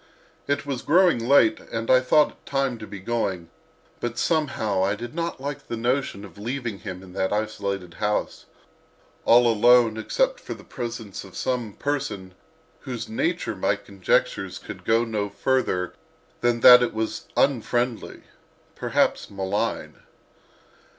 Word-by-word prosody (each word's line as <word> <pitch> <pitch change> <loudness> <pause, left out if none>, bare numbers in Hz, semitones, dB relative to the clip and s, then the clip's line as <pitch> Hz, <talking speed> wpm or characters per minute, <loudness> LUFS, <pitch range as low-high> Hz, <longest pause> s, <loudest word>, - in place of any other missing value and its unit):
It 145 0 0
was 135 -3 -3
growing 175 -3 +4
late 135 -5 +5
and 115 0 -3
I 130 - +7
thought 150 +4 +4
it - - -26
time 135 -4 -1
to 110 - -8
be 100 - -8
going, 95 -5 -2 0.5
but 120 0 -4
somehow 120 - 0
I 100 +2 +1
did 120 +2 -7
not 170 -2 -3
like 140 +1 -6
the 115 - -4
notion 120 -3 -1
of 100 0 -14
leaving 120 -2 -4
him 95 -3 -7
in 90 -1 -13
that 95 0 -1
isolated 100 -4 -3
house, 105 0 -2 0.8
all 120 +1 +6
alone 115 0 +5
except - - 0
for - - -7
the - - -14
presence 115 -5 -6
of 95 -2 -12
some 120 -5 -2
person 105 -11 -3
of - - -24 0.5
whose 125 - -5
nature 275 +10 -1
my - - +1
conjectures - - -1
could - - -10
go 115 +1 +3
no 105 -3 -2
further 100 -8 0 0.5
than 120 -1 +1
that 125 0 +10
it 120 - -1
was 110 0 -3
unfriendly, 120 -2 0 0.5
perhaps - - 0
malign. 100 +1 -2
120 Hz, 150 wpm, -24 LUFS, 105-135 Hz, 0.8 s, that